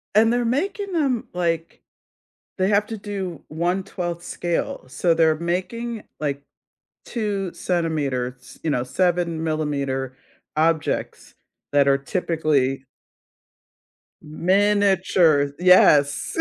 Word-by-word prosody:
And 225 +2 +5
they're 245 0 +1
making 390 - -1
them, 270 -8 0
like 170 -2 -2 0.8
They 185 +1 +2
have 210 0 +2
to 225 -2 -5
do 195 -6 -5
1/12 175 +1 -3
scale, 175 -6 -3
so, 170 +5 +1
they're 160 -1 +3
making, 210 +7 -3 0.2
like, 140 -2 -2 0.6
2 200 -5 -3
centimeters, 140 -8 -2
you 160 - 0
know, 125 -2 0
7 170 +2 0
millimeter 140 -4 -2 0.4
objects 160 0 -1 0.4
that 140 -1 +4
are 140 0 +4
typically 140 -4 0 1.4
M 155 +3 -9
miniature, 190 -7 +3
yes. 150 -6 +5
170 Hz, 100 wpm, -23 LUFS, 150-195 Hz, 1.4 s, And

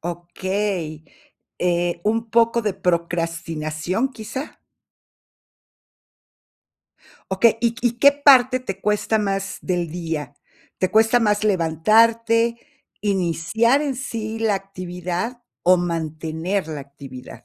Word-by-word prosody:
Okey. 175 -1 -3 0.5
Eh, 175 -1 0
¿un 225 +1 0
poco 230 0 +3
de 210 - 0
procrastinación, 170 +3 -2
quizá? 260 +6 -7 2.7
Okey, 225 +4 +3
¿y 235 -1 +1
y 240 -1 +2
qué 280 +2 +7
parte 260 -3 +5
te 195 -7 -6
cuesta 210 +1 +1
más 195 -1 -2
del 175 -3 -2
día? 160 -5 -4 0.4
¿Te 185 - 0
cuesta 225 +2 +4
más 210 -2 +1
levantarte, 225 +6 +3 0.5
iniciar 200 - +1
en 280 -4 -2
sí 225 -4 -4
la 225 -2 +1
actividad 185 +4 -5 0.2
o 185 +1 +5
mantener 165 +1 -2
la 150 -2 -5
actividad? 135 -2 -11
195 Hz, 105 wpm, -22 LUFS, 170-230 Hz, 2.7 s, qué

